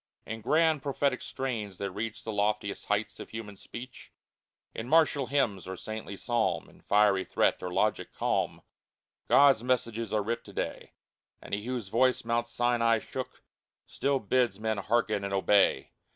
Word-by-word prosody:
In 115 +1 -6
grand, 155 +4 +3
prophetic 140 -1 0
strains 110 -8 -4
that 100 -1 -3
reach 110 +3 -5
The 110 - -4
loftiest 105 -1 -1
heights 105 +1 -1
of - - -8
human 110 -2 -7
speech, 120 +5 -10 0.6
In 115 +2 -5
martial 155 -4 +4
hymn, 125 -7 +1
or 95 0 -5
saintly 110 -1 -6
psalm, 120 0 0
In - - -21
fiery 100 -2 +3
threat, - - +1
or 90 - -4
logic 105 +4 0
calm, - - -1 0.6
God's 140 -5 +6
messages 115 -3 -1
are 105 -1 +1
writ 115 +2 -2
to 100 - -12
day - - -4 0.2
— - - -57
And - - -10
He 105 +2 -2
whose 125 -6 -3
voice 125 +2 +2
Mount 120 0 0
Sinai 120 -1 +2
shook 130 +4 -7 0.4
Still 140 0 0
bids 115 -2 +1
men 110 -1 -1
hearken 110 -1 +1
and 100 0 -2
obey 95 -7 +3
115 Hz, 165 wpm, -29 LUFS, 105-125 Hz, 0.6 s, God's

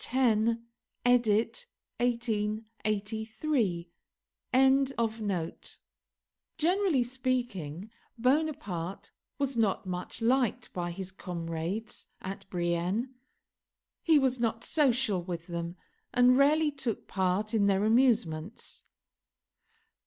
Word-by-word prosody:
10, 230 -2 +2 0.4
edit. 245 - +2 0.3
1883)] 220 - -1 2.7
Generally 345 -4 +3
speaking, 240 - -2 0.3
Bonaparte 250 - -1 0.3
was 275 -2 -1
not 215 -4 +1
much 180 +2 -5
liked 245 0 +1
by 175 -1 -2
his 190 +2 -6
comrades 175 +3 -4
at 190 +1 -7
Brienne. 180 +8 -1 0.9
He 320 -2 +5
was 260 -3 +2
not 225 -1 0
social 255 - +2
with 170 -2 -5
them, 170 -1 -4 0.4
and 250 0 +5
rarely 300 +3 +4
took 260 -6 -3
part 190 +3 0
in 205 -3 +3
their 200 +1 +3
amusements. 220 -6 +1
220 Hz, 85 wpm, -30 LUFS, 185-255 Hz, 2.7 s, He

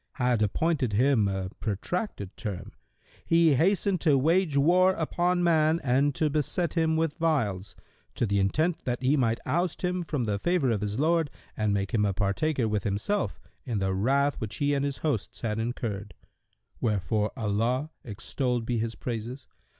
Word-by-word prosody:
had 125 -4 +1
appointed 130 +2 +1
him 120 -1 +3
a 95 -1 -3
protracted 105 - -3
term,[FN#128] 100 -5 -5 0.5
he 165 -2 +4
hastened 185 +4 +2
to 150 -5 +4
wage 160 +2 +2
war 180 +6 +5
upon 175 +2 0
man 160 -1 +3
and 135 +2 +2
to 155 - +1
beset 155 +3 -1
him 160 -1 +2
with 160 0 -1
wiles, 105 - 0 0.4
to - - +1
the 100 -2 +1
intent 155 - +1
that 125 0 -3
he 135 +3 +3
might 115 -5 +2
oust 175 +1 -1
him 180 0 0
from 150 -6 -2
the 105 -2 -1
favour 175 - +1
of 105 -3 -1
his 105 0 -2
Lord 165 0 +2 0.3
and 110 -1 0
make 100 -1 -1
him 110 -3 +2
a 100 -1 +1
partaker 115 +7 0
with 105 -2 -1
himself 105 - -1 0.2
in 120 -5 -3
the 95 -1 0
wrath 140 +8 +1
which 105 -5 -4
he 145 0 +1
and 140 -1 0
his 140 -1 -2
hosts 145 -10 -2
had 110 -2 -2
incurred; 110 -4 -4 0.6
wherefore 105 0 0
Allah 115 +7 0
(extolled 120 +2 -2
be 120 -1 -1
His 115 +1 -2
praises!) 120 +2 -5
130 Hz, 170 wpm, -27 LUFS, 105-160 Hz, 0.6 s, war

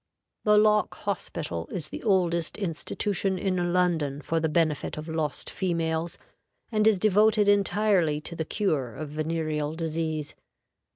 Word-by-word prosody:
The 210 0 +5
Lock 210 0 +3
Hospital - - -4
is - - -4
the - - -7
oldest 175 -6 +1
institution 195 +1 -1
in 180 -2 0
London 165 -6 +1
for 165 - 0
the 160 0 0
benefit 155 -4 0
of 155 +1 -6
lost 160 -2 -2
females, 165 -2 -1 0.5
and 215 -1 +3
is 220 -3 +5
devoted 210 +1 +4
entirely 200 -6 +3
to 170 - -7
the 160 - -2
cure 150 - -1
of 150 +1 -6
venereal 155 0 -2
disease. 160 -2 -2
170 Hz, 135 wpm, -27 LUFS, 155-200 Hz, 0.5 s, The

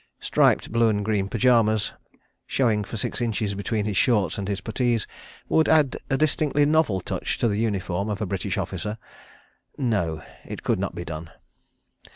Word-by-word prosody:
Striped - - +2
blue 115 0 +3
and 105 -1 0
green 100 -3 0
pyjamas, 110 -3 +3 0.5
showing 110 -6 +1
for 110 - -6
six 105 - -2
inches 110 -3 -1
between 105 +1 -2
his 105 -2 -2
shorts 105 -5 +2
and 100 - -3
his 100 -1 -2
puttees, 115 +1 0 0.4
would 160 - +3
add 150 -4 +4
a 135 - +2
distinctly 150 -1 +2
novel 150 -11 +2
touch - - -3
to 120 - +1
the 105 -1 0
uniform 100 -2 -1
of 105 -2 -2
a 105 - -1
British 95 0 -2
officer.... 95 +3 -3 0.8
No. 100 - -1 0.2
It - - -8
could - - +1
not - - -3
be 85 - -5
done. 80 0 -6
105 Hz, 170 wpm, -25 LUFS, 100-120 Hz, 0.8 s, add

